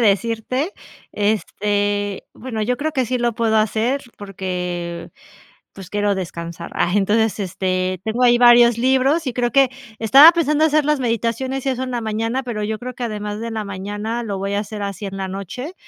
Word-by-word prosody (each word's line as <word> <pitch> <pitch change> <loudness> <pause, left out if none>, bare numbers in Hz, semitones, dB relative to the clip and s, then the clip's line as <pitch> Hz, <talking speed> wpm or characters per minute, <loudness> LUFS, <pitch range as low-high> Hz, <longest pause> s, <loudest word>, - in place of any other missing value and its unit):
decirte, 230 - -1 0.4
este, 205 -1 -1
bueno, 230 -3 -5
yo 250 +3 0
creo 310 +4 -2
que 260 -5 0
sí 255 +2 -1
lo 240 -1 0
puedo 220 -1 +1
hacer 225 +5 +1 0.2
porque, 180 -3 -5 0.6
pues, 190 -2 -11
quiero 205 0 0
descansar. 170 -2 -6
Ah, 175 - +1
entonces, 215 +2 +2
este, 185 -1 -2
tengo 235 +3 0
ahí 240 0 +5
varios 240 -1 +7
libros 265 +6 +2
y - - -2
creo 240 0 -1
que 270 -2 +4 0.3
estaba 275 +9 +9
pensando 310 -2 +2
hacer 305 -1 +3
las 300 -1 +2
meditaciones 240 +2 -1
y 275 - 0
eso 260 0 -1
en 255 - -5
la 240 - -1
mañana, 225 +4 -2
pero 225 -4 -4
yo 215 +1 -3
creo 250 0 -6
que 245 - -4
además 210 -2 -4
de 230 0 -4
la 220 -1 -2
mañana 205 +4 -4
lo 200 -3 -3
voy 200 +1 -2
a 205 - +1
hacer 210 0 -6
así 200 0 -4
en 195 0 -6
la 190 -1 -3
noche, 200 - -6
220 Hz, 190 wpm, -20 LUFS, 200-250 Hz, 0.6 s, estaba